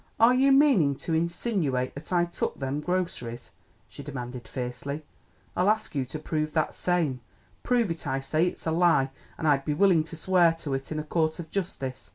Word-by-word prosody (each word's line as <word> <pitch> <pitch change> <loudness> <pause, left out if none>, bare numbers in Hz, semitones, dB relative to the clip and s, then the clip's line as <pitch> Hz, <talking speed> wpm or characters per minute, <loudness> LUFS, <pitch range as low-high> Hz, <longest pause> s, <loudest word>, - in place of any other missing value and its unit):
"Are 230 +2 +7
you 270 +2 +4
meaning 270 - +5
to 165 - -4
insinooate 165 - 0
that 145 +6 -9
I 175 -1 +3
took 170 - -3
them 135 +1 -2
groceries?" 170 -9 -3 0.4
she - - -10
demanded 125 -4 -6
fiercely. 135 +4 -5 0.5
"I'll 185 +3 +3
ask 215 0 0
you 135 -3 -1
to 130 - -6
prove 155 0 -2
that 155 -2 +1
same. 160 -8 0 0.4
Prove 240 -6 +1
it, 165 -2 -5
I 135 -1 0
say! 155 +5 +1
It's - - -5
a 160 - +1
lie, 160 -5 +3 0.3
an' - - -4
I'd 140 -2 +3
be 150 0 -1
willin' 180 -2 +4
to 165 - -8
swear 175 0 +4
to 160 -4 -5
it 135 +2 -4
in 155 - -2
a 155 - -2
court 155 0 0
of 165 -3 -8
justice. 135 - -4
155 Hz, 200 wpm, -27 LUFS, 135-180 Hz, 0.5 s, Are